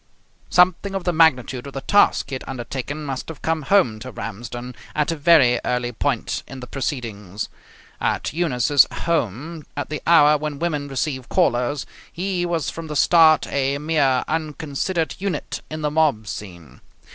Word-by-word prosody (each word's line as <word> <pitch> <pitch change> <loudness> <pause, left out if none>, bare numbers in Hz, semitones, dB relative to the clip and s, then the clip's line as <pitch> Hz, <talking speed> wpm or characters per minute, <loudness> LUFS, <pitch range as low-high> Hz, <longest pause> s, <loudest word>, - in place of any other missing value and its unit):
Something 185 +2 +3
of 190 - -2
the 175 0 0
magnitude 135 -5 +2
of 140 - -9
the 135 - -4
task 205 -3 +3
he - - -7
had 130 - -4
undertaken 135 +3 -5
must 135 -3 -4
have 160 - -9
come 160 -1 0
home 135 - +2
to 130 - -8
Ramsden 120 +4 -6 0.2
at 150 +1 +1
a - - -1
very 145 -6 +5
early 125 0 -1
point 125 +1 -1
in 135 - -9
the 125 - -7
proceedings. 115 - -4 0.5
At - - -1
Eunice's 145 -4 +3
home, 155 - -2
at 145 - -3
the 150 0 -4
hour 150 -3 +6
when 150 -1 -4
women 150 -3 -2
receive 135 -1 -3
callers, 140 -5 +1 0.3
he 180 0 -2
was 165 -4 -1
from 165 -1 -7
the 150 - -5
start 160 -2 +5
a 140 0 0
mere 145 -4 +1
unconsidered 160 +2 -2
unit 195 -1 -3
in 155 0 -5
the 150 - 0
mob 150 -8 +2
scene. 85 -9 -9
145 Hz, 165 wpm, -22 LUFS, 125-160 Hz, 0.5 s, hour